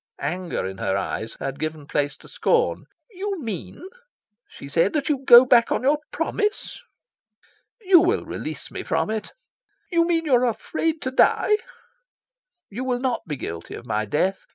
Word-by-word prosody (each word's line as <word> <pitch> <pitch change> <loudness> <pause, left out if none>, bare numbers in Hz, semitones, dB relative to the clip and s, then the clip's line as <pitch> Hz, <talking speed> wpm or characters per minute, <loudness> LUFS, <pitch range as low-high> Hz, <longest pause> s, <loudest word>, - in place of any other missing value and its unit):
Anger 180 +2 -3
in 95 0 -6
her 95 - 0
eyes 110 +3 -4
had 135 0 -4
given 155 -1 -4
place 145 0 -1
to - - -17
scorn. 475 0 +1 0.3
"You 390 0 -4
mean," 225 - -6 0.6
she - - -11
said, 165 +7 +1
"that 300 -1 -1
you 290 -3 +1
go 245 -1 +9
back 235 -2 +4
on - - 0
your 290 +3 +3
promise?" 415 +6 -2 1.0
"You 375 -3 +6
will 360 +6 +1
release - - -6
me - - -5
from - - -1
it." 220 -1 -4 0.6
"You 335 -1 +3
mean 330 -1 +1
you 290 - +1
are 250 0 +4
afraid 315 +7 -2
to 260 - -2
die?" 420 +9 +4 1.2
"You 240 +6 -4
will 255 -1 0
not 250 -6 -2
be 150 - -3
guilty 85 -10 -7
of 120 - -10
my 110 -2 -1
death. 185 - -1
245 Hz, 170 wpm, -23 LUFS, -, 1.2 s, go